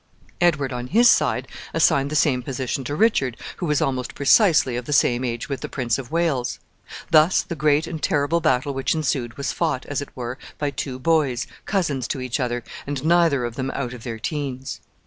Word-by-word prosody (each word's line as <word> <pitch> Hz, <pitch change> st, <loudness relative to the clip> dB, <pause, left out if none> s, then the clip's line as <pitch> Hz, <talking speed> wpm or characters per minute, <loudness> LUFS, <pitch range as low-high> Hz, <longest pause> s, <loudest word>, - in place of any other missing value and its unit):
Edward, 150 Hz, -7 st, +2 dB
on 125 Hz, 0 st, -4 dB
his 235 Hz, -, +5 dB
side, -, -, +3 dB, 0.3 s
assigned 140 Hz, 0 st, +3 dB
the 155 Hz, -, -3 dB
same 140 Hz, -4 st, +3 dB
position 130 Hz, +1 st, -3 dB
to 145 Hz, -, -3 dB
Richard, 145 Hz, -, +2 dB, 0.2 s
who 175 Hz, -, -3 dB
was 150 Hz, -1 st, +2 dB
almost 130 Hz, -2 st, -2 dB
precisely 145 Hz, -, +4 dB
of 125 Hz, 0 st, -4 dB
the 150 Hz, -, -2 dB
same 125 Hz, -2 st, +3 dB
age 120 Hz, -1 st, -3 dB
with 140 Hz, -2 st, -4 dB
the -, -, -5 dB
Prince 125 Hz, -2 st, -1 dB
of 125 Hz, -3 st, -7 dB
Wales. 160 Hz, -7 st, 0 dB, 0.5 s
Thus 160 Hz, +3 st, +5 dB
the 170 Hz, -, -6 dB
great 150 Hz, +1 st, +2 dB
and 165 Hz, -2 st, -6 dB
terrible 160 Hz, 0 st, +1 dB
battle 140 Hz, -3 st, +1 dB
which 135 Hz, +3 st, 0 dB
ensued 130 Hz, -6 st, -2 dB
was 140 Hz, -, -2 dB
fought, 130 Hz, -, -1 dB
as 145 Hz, -1 st, -3 dB
it 145 Hz, -, -7 dB
were, 125 Hz, +2 st, -5 dB, 0.2 s
by 145 Hz, -2 st, -1 dB
two 130 Hz, -1 st, -4 dB
boys, 135 Hz, -3 st, +1 dB, 0.2 s
cousins 150 Hz, -, 0 dB
to 135 Hz, -, -3 dB
each 130 Hz, +1 st, -2 dB
other, 120 Hz, -2 st, -2 dB, 0.2 s
and 145 Hz, 0 st, -3 dB
neither 165 Hz, -6 st, +3 dB
of 120 Hz, -1 st, -5 dB
them 135 Hz, 0 st, -2 dB
out 125 Hz, -3 st, -3 dB
of 125 Hz, -, -9 dB
their 115 Hz, -1 st, -5 dB
teens. 135 Hz, 0 st, -4 dB
140 Hz, 205 wpm, -23 LUFS, 125-155 Hz, 0.5 s, his